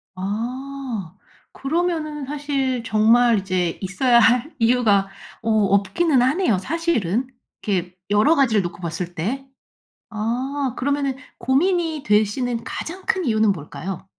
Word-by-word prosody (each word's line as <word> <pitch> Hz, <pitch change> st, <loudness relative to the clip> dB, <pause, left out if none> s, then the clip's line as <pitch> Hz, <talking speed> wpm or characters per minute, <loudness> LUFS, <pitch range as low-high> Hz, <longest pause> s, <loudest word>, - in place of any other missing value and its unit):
아 230 Hz, 0 st, -5 dB, 0.4 s
그러면은 310 Hz, -1 st, -2 dB
사실 275 Hz, -3 st, -2 dB
정말 230 Hz, +1 st, +4 dB
이제 185 Hz, -3 st, -1 dB
있어야 235 Hz, +6 st, +3 dB
할 245 Hz, +6 st, +3 dB
이유가 225 Hz, -5 st, +3 dB, 0.3 s
어 225 Hz, -, -2 dB
없기는 215 Hz, -, +2 dB
하네요 260 Hz, -, +2 dB
사실은 250 Hz, -, -1 dB, 0.4 s
이렇게 180 Hz, -3 st, -2 dB
여러 210 Hz, +11 st, +4 dB
가지를 245 Hz, -8 st, +3 dB
놓고 175 Hz, -1 st, -6 dB
봤을 175 Hz, +1 st, -4 dB
때. 250 Hz, +12 st, -3 dB, 0.7 s
아 255 Hz, +5 st, -2 dB
그러면은 280 Hz, 0 st, -1 dB, 0.2 s
고민이 320 Hz, +4 st, +1 dB
되시는 225 Hz, +3 st, +1 dB
가장 370 Hz, +4 st, -6 dB
큰 375 Hz, -2 st, +1 dB
이유는 220 Hz, -4 st, +3 dB
뭘까요? 180 Hz, +3 st, -7 dB
235 Hz, 260 characters per minute, -22 LUFS, 200-275 Hz, 0.7 s, 정말